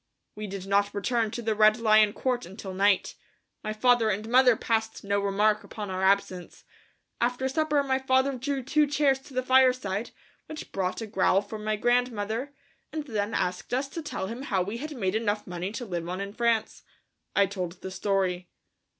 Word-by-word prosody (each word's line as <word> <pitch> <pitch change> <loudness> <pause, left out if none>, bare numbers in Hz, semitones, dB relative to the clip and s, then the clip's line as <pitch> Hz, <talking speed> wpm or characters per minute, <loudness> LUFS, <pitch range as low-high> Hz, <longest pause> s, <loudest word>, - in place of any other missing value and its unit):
We 210 0 -6
did 195 -1 -6
not 200 +1 +1
return 225 +2 0
to 235 +2 -6
the 220 0 +1
Red 215 0 +5
Lion 215 -2 +4
Court 250 -3 -2
until 190 0 -8
night. 200 +1 +2 0.5
My 215 - -2
father 235 0 +3
and 210 +2 -2
mother 250 0 +5
passed 225 0 -1
no 200 0 0
remark 210 +2 +2
upon 205 -3 -7
our 185 0 -3
absence. 190 -2 0 0.6
After 245 +2 +1
supper 300 0 +1
my 265 -1 0
father 265 +1 +2
drew 265 +1 -3
two 300 +3 +2
chairs 280 -2 +2
to 270 0 -15
the 255 - 0
fireside, 255 -5 +3 0.4
which 310 -1 -8
brought 185 +2 -2
a - - -3
growl 195 -1 +2
from 215 0 -8
my 215 0 0
grandfather, 240 +1 0 0.4
and 310 -1 -3
then 215 -4 -2
asked 180 +6 -1
us 270 +2 -1
to 330 - -5
tell 295 - -4
him 230 +6 -6
how 195 -9 0
we 205 +5 -5
had 300 +4 -6
made 190 -4 0
enough 215 -1 -1
money 180 +2 -4
to 245 +1 -5
live 175 -4 -4
on 185 +1 -3
in 200 0 -5
France. 230 -1 0 0.5
I 200 - +5
told 185 -3 -4
the 190 +1 -9
story. 185 -2 -1
215 Hz, 190 wpm, -27 LUFS, 200-250 Hz, 0.6 s, Red